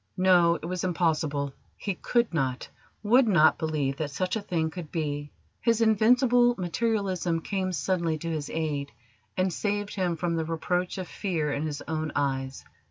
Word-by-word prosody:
No, 180 Hz, -2 st, +5 dB
it 160 Hz, -, -7 dB
was 180 Hz, +1 st, -3 dB
impossible: 155 Hz, -5 st, 0 dB, 0.2 s
he 200 Hz, -, -2 dB
could 235 Hz, +3 st, 0 dB
not, 130 Hz, -5 st, -1 dB, 0.4 s
would 240 Hz, +4 st, +5 dB
not, 170 Hz, -7 st, +5 dB
believe 150 Hz, -4 st, -1 dB
that, 155 Hz, -2 st, -2 dB
such 185 Hz, +8 st, -2 dB
a 220 Hz, -, -2 dB
thing 160 Hz, -5 st, -1 dB
could 165 Hz, -4 st, -8 dB
be. 145 Hz, -2 st, -3 dB, 0.3 s
His 230 Hz, -1 st, +2 dB
invincible 240 Hz, +2 st, +4 dB
materialism 185 Hz, -2 st, 0 dB
came 190 Hz, +1 st, -2 dB
suddenly 170 Hz, -2 st, 0 dB
to 165 Hz, -, -6 dB
his 150 Hz, -3 st, -3 dB
aid, 150 Hz, -3 st, -2 dB, 0.5 s
and 185 Hz, -1 st, +1 dB
saved 205 Hz, +1 st, -2 dB
him 180 Hz, -3 st, 0 dB
from 170 Hz, +1 st, -1 dB
the 160 Hz, -, 0 dB
reproach 180 Hz, +3 st, -1 dB
of 185 Hz, -2 st, -4 dB
fear 160 Hz, -8 st, -2 dB
in 155 Hz, +2 st, -2 dB
his 145 Hz, -1 st, -5 dB
own 155 Hz, -1 st, -2 dB
eyes. 135 Hz, -2 st, -2 dB
170 Hz, 165 wpm, -27 LUFS, 155-195 Hz, 0.5 s, No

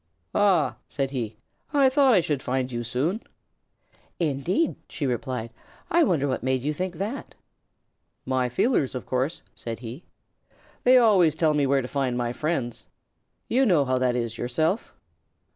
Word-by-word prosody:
"Ah!" 180 Hz, -10 st, +3 dB
said 135 Hz, -2 st, -2 dB
he. 115 Hz, -5 st, -4 dB, 0.4 s
"I 275 Hz, -2 st, +6 dB
thought 265 Hz, -2 st, +5 dB
I 185 Hz, -, +5 dB
should 150 Hz, -4 st, -1 dB
find 130 Hz, 0 st, -1 dB
you 120 Hz, -1 st, -3 dB
soon." 150 Hz, -, -1 dB, 1.0 s
"Indeed?" 170 Hz, -, 0 dB
she 150 Hz, -, -3 dB
replied. 125 Hz, -2 st, -2 dB, 0.4 s
"I 340 Hz, 0 st, +5 dB
wonder 160 Hz, -, +2 dB
what 130 Hz, -, -1 dB
made 130 Hz, 0 st, 0 dB
you 150 Hz, +2 st, 0 dB
think 180 Hz, +2 st, -3 dB
that?" 210 Hz, -, -5 dB, 0.9 s
"My 130 Hz, -1 st, 0 dB
feelers, 135 Hz, -, +1 dB
of 125 Hz, -, -5 dB
course," 130 Hz, +6 st, -2 dB
said 115 Hz, 0 st, -6 dB
he. 125 Hz, +8 st, -8 dB, 0.8 s
"They 255 Hz, +1 st, +7 dB
always 195 Hz, -10 st, +5 dB
tell 160 Hz, -1 st, +2 dB
me 145 Hz, -2 st, +2 dB
where 135 Hz, -1 st, +2 dB
to -, -, -4 dB
find 130 Hz, -3 st, -1 dB
my 120 Hz, -1 st, -1 dB
friends. 130 Hz, -6 st, -3 dB, 0.6 s
You 260 Hz, +3 st, +3 dB
know 175 Hz, -, +4 dB
how 130 Hz, 0 st, +1 dB
that 125 Hz, -1 st, +1 dB
is 115 Hz, -2 st, -3 dB
yourself." 155 Hz, -, 0 dB
140 Hz, 160 wpm, -25 LUFS, 125-180 Hz, 1.0 s, They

